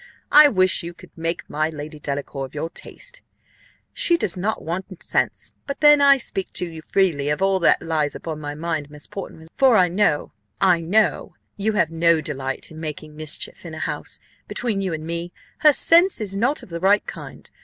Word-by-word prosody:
I 300 Hz, 0 st, +9 dB
wish 185 Hz, -8 st, +3 dB
you 170 Hz, 0 st, -8 dB
could -, -, -16 dB
make 165 Hz, +1 st, -3 dB
my 155 Hz, +1 st, -1 dB
Lady 150 Hz, 0 st, -8 dB
Delacour 140 Hz, -1 st, -4 dB
of 130 Hz, -, -21 dB
your 160 Hz, +3 st, -4 dB
taste -, -, -8 dB, 0.7 s
she 430 Hz, -9 st, +3 dB
does 200 Hz, -, +2 dB
not 205 Hz, +4 st, -2 dB
want 185 Hz, +2 st, -5 dB
sense -, -, -1 dB, 0.2 s
but 280 Hz, -, -4 dB
then 295 Hz, -1 st, +7 dB
(I 280 Hz, -1 st, +7 dB
speak 195 Hz, -6 st, -3 dB
to -, -, +1 dB
you 160 Hz, -1 st, -9 dB
freely 160 Hz, -6 st, +1 dB
of 150 Hz, -, 0 dB
all 195 Hz, -1 st, +2 dB
that 170 Hz, -, +3 dB
lies 155 Hz, -3 st, -1 dB
upon 160 Hz, -2 st, -6 dB
my 145 Hz, -1 st, -6 dB
mind, 155 Hz, -2 st, -3 dB
Miss 150 Hz, 0 st, -6 dB
Portman, 160 Hz, -4 st, -9 dB
for 260 Hz, -4 st, +4 dB
I 180 Hz, -1 st, +4 dB
know 175 Hz, -5 st, +1 dB, 0.3 s
I 180 Hz, -3 st, +3 dB
know 205 Hz, +6 st, +1 dB, 0.2 s
you 215 Hz, +2 st, -1 dB
have 170 Hz, -6 st, +1 dB
no 165 Hz, 0 st, +3 dB
delight 135 Hz, -3 st, -4 dB
in 155 Hz, -, -10 dB
making 155 Hz, -1 st, -7 dB
mischief 155 Hz, -, -4 dB
in -, -, -8 dB
a -, -, -8 dB
house,) -, -, -4 dB, 0.3 s
between 225 Hz, -5 st, -2 dB
you 190 Hz, -2 st, -2 dB
and 155 Hz, -1 st, -5 dB
me, 170 Hz, +1 st, -4 dB, 0.3 s
her 305 Hz, -, +7 dB
sense 340 Hz, +5 st, +5 dB
is 200 Hz, -3 st, -4 dB
not 245 Hz, +9 st, 0 dB
of -, -, -13 dB
the 170 Hz, 0 st, -5 dB
right 200 Hz, +3 st, +3 dB
kind. -, -, -9 dB
170 Hz, 200 wpm, -22 LUFS, 155-210 Hz, 0.7 s, I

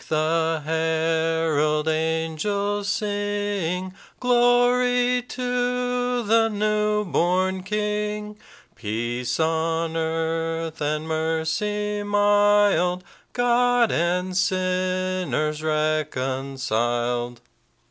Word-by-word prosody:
the 160 Hz, 0 st, +1 dB
herald 160 Hz, -1 st, +1 dB
angels 165 Hz, +6 st, -1 dB
sing, 205 Hz, -3 st, -2 dB, 0.3 s
'Glory 245 Hz, 0 st, +3 dB
to 245 Hz, 0 st, -1 dB
the 225 Hz, +1 st, +3 dB
new 210 Hz, 0 st, 0 dB
born 185 Hz, +1 st, +1 dB
King; 210 Hz, +1 st, -3 dB, 0.4 s
Peace 120 Hz, +3 st, -3 dB
on 165 Hz, 0 st, 0 dB
earth 165 Hz, 0 st, -2 dB
and 150 Hz, +1 st, -1 dB
mercy 165 Hz, +7 st, -1 dB
mild, 205 Hz, -3 st, +3 dB, 0.3 s
God 245 Hz, -1 st, +3 dB
and 180 Hz, +2 st, 0 dB
sinners 185 Hz, -4 st, 0 dB
reconciled.'" 130 Hz, -6 st, -1 dB
180 Hz, 65 wpm, -23 LUFS, 160-210 Hz, 0.4 s, Glory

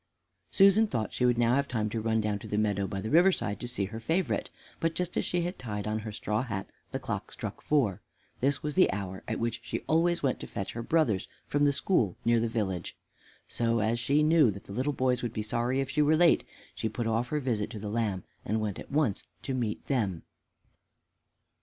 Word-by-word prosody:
Susan 200 Hz, +3 st, +6 dB
thought 110 Hz, -, -2 dB
she 125 Hz, -, +2 dB
would 120 Hz, -1 st, +3 dB
now 120 Hz, 0 st, +3 dB
have 140 Hz, +2 st, +2 dB
time 110 Hz, -5 st, -1 dB
to 110 Hz, +1 st, -2 dB
run 110 Hz, 0 st, +1 dB
down 105 Hz, -1 st, -1 dB
to -, -, -9 dB
the 105 Hz, -, -2 dB
meadow 100 Hz, -2 st, +1 dB
by 100 Hz, -1 st, -4 dB
the 110 Hz, +3 st, -4 dB
river 175 Hz, +5 st, +6 dB
side 105 Hz, -, -2 dB
to 120 Hz, -, -5 dB
see 120 Hz, -5 st, -2 dB
her 110 Hz, +3 st, -6 dB
favorite, 165 Hz, +10 st, 0 dB, 0.3 s
but 165 Hz, 0 st, 0 dB
just 180 Hz, -1 st, -2 dB
as -, -, +1 dB
she 175 Hz, -1 st, 0 dB
had 175 Hz, +2 st, -4 dB
tied 105 Hz, -4 st, -4 dB
on 110 Hz, 0 st, -1 dB
her 110 Hz, 0 st, -6 dB
straw 105 Hz, +1 st, -1 dB
hat 105 Hz, -6 st, -4 dB, 0.2 s
the -, -, -1 dB
clock -, -, -4 dB
struck -, -, -6 dB
four. 125 Hz, -12 st, +1 dB, 0.4 s
This 140 Hz, +3 st, +1 dB
was 150 Hz, 0 st, -2 dB
the 185 Hz, -, +5 dB
hour 95 Hz, -1 st, -4 dB
at -, -, -1 dB
which 115 Hz, 0 st, -1 dB
she -, -, -3 dB
always 170 Hz, +1 st, +2 dB
went 130 Hz, -3 st, +1 dB
to -, -, -7 dB
fetch 100 Hz, -, -4 dB
her 120 Hz, -, -5 dB
brothers 115 Hz, -, +1 dB, 0.2 s
from 145 Hz, 0 st, +2 dB
the 145 Hz, -, +5 dB
school 135 Hz, -, +1 dB
near 115 Hz, 0 st, +4 dB
the 115 Hz, 0 st, 0 dB
village. 100 Hz, -6 st, -2 dB, 0.5 s
So, 115 Hz, 0 st, +1 dB
as 110 Hz, +2 st, +1 dB
she 145 Hz, +5 st, +3 dB
knew 155 Hz, -4 st, +5 dB
that 100 Hz, -1 st, -5 dB
the 100 Hz, -, -9 dB
little 130 Hz, +7 st, 0 dB
boys 130 Hz, -2 st, +1 dB
would 120 Hz, -2 st, -3 dB
be 110 Hz, -, -2 dB
sorry 120 Hz, +5 st, 0 dB
if 135 Hz, -, -3 dB
she 150 Hz, -, +2 dB
were 155 Hz, +2 st, +4 dB
late, 170 Hz, 0 st, +5 dB, 0.3 s
she 110 Hz, -, -2 dB
put 115 Hz, +2 st, -3 dB
off 115 Hz, +2 st, +1 dB
her 150 Hz, +3 st, -1 dB
visit 115 Hz, -7 st, -1 dB
to 110 Hz, -, -7 dB
the 105 Hz, -, -5 dB
lamb 105 Hz, -4 st, -1 dB, 0.2 s
and 110 Hz, +2 st, 0 dB
went 105 Hz, -3 st, -2 dB
at -, -, -9 dB
once 140 Hz, -8 st, +1 dB, 0.2 s
to 135 Hz, -, -2 dB
meet 115 Hz, -4 st, -2 dB
them. 105 Hz, -, -1 dB
115 Hz, 235 wpm, -29 LUFS, 105-145 Hz, 0.5 s, Susan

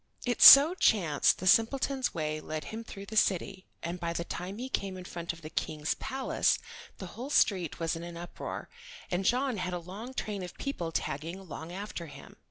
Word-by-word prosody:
It 245 Hz, -1 st, -1 dB
so 285 Hz, +5 st, +11 dB
chanced 180 Hz, -, +3 dB
the 185 Hz, -, -7 dB
simpleton's 260 Hz, +6 st, +2 dB
way 155 Hz, -1 st, -3 dB
led 155 Hz, 0 st, -5 dB
him 225 Hz, +1 st, -5 dB
through 200 Hz, -3 st, -9 dB
the 220 Hz, -, -8 dB
city 190 Hz, -2 st, +1 dB, 0.2 s
and 170 Hz, +2 st, -4 dB
by 170 Hz, -1 st, -2 dB
the 170 Hz, -, -2 dB
time 180 Hz, +3 st, -6 dB
he 250 Hz, +3 st, -5 dB
came 195 Hz, -7 st, -3 dB
in 180 Hz, -, -9 dB
front 170 Hz, -1 st, -5 dB
of 165 Hz, -1 st, -13 dB
the 155 Hz, -, -7 dB
King's 155 Hz, -1 st, -2 dB
palace 270 Hz, 0 st, 0 dB, 0.4 s
the 190 Hz, -, -7 dB
whole 250 Hz, +5 st, -7 dB
street 185 Hz, -, +2 dB
was 165 Hz, 0 st, -1 dB
in 165 Hz, -, -6 dB
an 170 Hz, 0 st, -8 dB
uproar, 175 Hz, +1 st, -7 dB, 0.4 s
and 180 Hz, +2 st, -1 dB
John 255 Hz, +1 st, +1 dB
had 180 Hz, -1 st, -3 dB
a -, -, -1 dB
long 200 Hz, +9 st, -9 dB
train 205 Hz, -5 st, -3 dB
of 180 Hz, -, -8 dB
people 175 Hz, -12 st, -4 dB
tagging 160 Hz, +3 st, -3 dB
along 170 Hz, -3 st, -9 dB
after 190 Hz, -2 st, -6 dB
him. 140 Hz, -2 st, -13 dB
185 Hz, 200 wpm, -30 LUFS, 170-225 Hz, 0.4 s, so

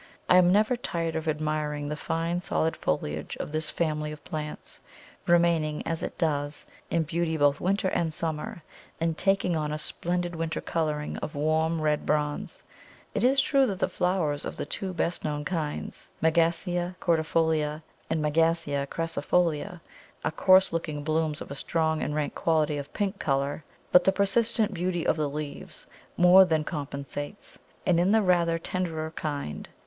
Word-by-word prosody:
I 180 Hz, -, +6 dB
am 180 Hz, -1 st, +6 dB
never 215 Hz, +5 st, +4 dB
tired 165 Hz, -8 st, -3 dB
of 160 Hz, 0 st, -3 dB
admiring 150 Hz, -1 st, -1 dB
the 150 Hz, -, -2 dB
fine 165 Hz, +3 st, -2 dB
solid 160 Hz, -2 st, 0 dB
foliage 75 Hz, 0 st, -2 dB
of -, -, -5 dB
this 155 Hz, 0 st, -1 dB
family 155 Hz, -2 st, -1 dB
of 150 Hz, -1 st, -10 dB
plants, 155 Hz, -3 st, -6 dB, 0.5 s
remaining, 170 Hz, -3 st, +3 dB
as 165 Hz, -1 st, -2 dB
it -, -, -5 dB
does, 145 Hz, -3 st, -1 dB, 0.2 s
in 165 Hz, -, +1 dB
beauty 165 Hz, 0 st, -1 dB
both 145 Hz, -1 st, +3 dB
winter 195 Hz, +1 st, +1 dB
and 165 Hz, -3 st, 0 dB
summer, 165 Hz, +4 st, -4 dB, 0.4 s
and 165 Hz, 0 st, 0 dB
taking 195 Hz, -1 st, +1 dB
on 150 Hz, -1 st, -1 dB
a 150 Hz, -, -2 dB
splendid 175 Hz, +3 st, -3 dB
winter 165 Hz, 0 st, -2 dB
colouring 150 Hz, -2 st, -2 dB
of 150 Hz, -, -5 dB
warm 160 Hz, +2 st, +1 dB
red 150 Hz, -1 st, +1 dB
bronze. 150 Hz, -1 st, -1 dB, 0.5 s
It -, -, -1 dB
is 265 Hz, +2 st, +4 dB
true 275 Hz, -1 st, +4 dB
that 195 Hz, -4 st, -2 dB
the -, -, +1 dB
flowers 180 Hz, -5 st, 0 dB
of -, -, -5 dB
the -, -, -3 dB
two 190 Hz, +5 st, -4 dB
best 175 Hz, -1 st, -2 dB
known 150 Hz, -1 st, -2 dB
kinds, 160 Hz, -4 st, -4 dB
M. 160 Hz, 0 st, +4 dB, 0.7 s
cordifolia 160 Hz, -2 st, +1 dB, 0.3 s
and 155 Hz, -1 st, 0 dB
M. 150 Hz, -, +1 dB
crassifolia, 165 Hz, +1 st, 0 dB, 0.4 s
are 160 Hz, -, +1 dB
coarse 185 Hz, +3 st, +5 dB
looking 155 Hz, -3 st, -3 dB
blooms 155 Hz, 0 st, 0 dB
of -, -, -8 dB
a -, -, -2 dB
strong 160 Hz, +2 st, 0 dB
and 150 Hz, -, -2 dB
rank 150 Hz, -1 st, -1 dB
quality 155 Hz, -2 st, +1 dB
of 140 Hz, 0 st, -8 dB
pink 200 Hz, -1 st, -2 dB
colour, 140 Hz, +2 st, -1 dB, 0.3 s
but 180 Hz, -, +7 dB
the 190 Hz, -, +5 dB
persistent 210 Hz, +2 st, +1 dB
beauty 175 Hz, -1 st, -1 dB
of -, -, +3 dB
the 150 Hz, -2 st, -1 dB
leaves 150 Hz, 0 st, -6 dB, 0.3 s
more 180 Hz, +2 st, +8 dB
than 160 Hz, -4 st, +1 dB
compensates; 145 Hz, +3 st, -6 dB, 0.3 s
and 175 Hz, -2 st, +3 dB
in 180 Hz, +2 st, +3 dB
the 220 Hz, +1 st, +4 dB
rather 170 Hz, -3 st, +3 dB
tenderer 165 Hz, -2 st, -3 dB
kind, 145 Hz, -, -4 dB
_M. -, -, -32 dB
160 Hz, 165 wpm, -27 LUFS, 150-175 Hz, 0.7 s, more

